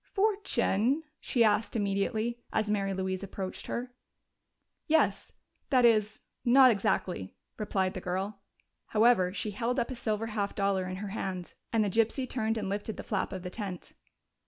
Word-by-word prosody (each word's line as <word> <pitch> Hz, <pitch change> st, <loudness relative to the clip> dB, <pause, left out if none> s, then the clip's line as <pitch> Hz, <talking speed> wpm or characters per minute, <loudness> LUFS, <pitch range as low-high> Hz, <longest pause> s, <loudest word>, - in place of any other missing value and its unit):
"Fortune?" 320 Hz, -, +2 dB, 0.2 s
she 240 Hz, -, +2 dB
asked 215 Hz, +1 st, +2 dB
immediately, 215 Hz, +3 st, 0 dB
as 215 Hz, -1 st, 0 dB
Mary 195 Hz, -2 st, 0 dB
Louise 190 Hz, -1 st, -2 dB
approached 195 Hz, -1 st, -5 dB
her. 245 Hz, +1 st, -4 dB, 0.9 s
"Yes 320 Hz, +1 st, +2 dB, 0.4 s
that 255 Hz, -4 st, +5 dB
is 215 Hz, -2 st, +3 dB, 0.2 s
not 255 Hz, +1 st, +7 dB
exactly," 190 Hz, -, -1 dB, 0.2 s
replied 190 Hz, -3 st, 0 dB
the 185 Hz, -, -5 dB
girl. 190 Hz, +3 st, -3 dB, 0.5 s
However, 215 Hz, -5 st, +4 dB
she 210 Hz, +2 st, -3 dB
held 235 Hz, +5 st, -1 dB
up 235 Hz, -, -1 dB
a -, -, -4 dB
silver 225 Hz, -2 st, -1 dB
half 200 Hz, -2 st, -1 dB
dollar 195 Hz, -2 st, +1 dB
in 185 Hz, -, -4 dB
her 200 Hz, +2 st, -5 dB
hand, 185 Hz, -4 st, -4 dB, 0.2 s
and 225 Hz, -2 st, +3 dB
the -, -, +1 dB
gypsy 230 Hz, +5 st, +1 dB
turned 225 Hz, -3 st, -1 dB
and 205 Hz, -3 st, -2 dB
lifted 205 Hz, +2 st, -3 dB
the -, -, -6 dB
flap 205 Hz, -, -1 dB
of 185 Hz, -2 st, -5 dB
the 180 Hz, -, -5 dB
tent. 195 Hz, -5 st, -6 dB
210 Hz, 160 wpm, -30 LUFS, 195-235 Hz, 0.9 s, not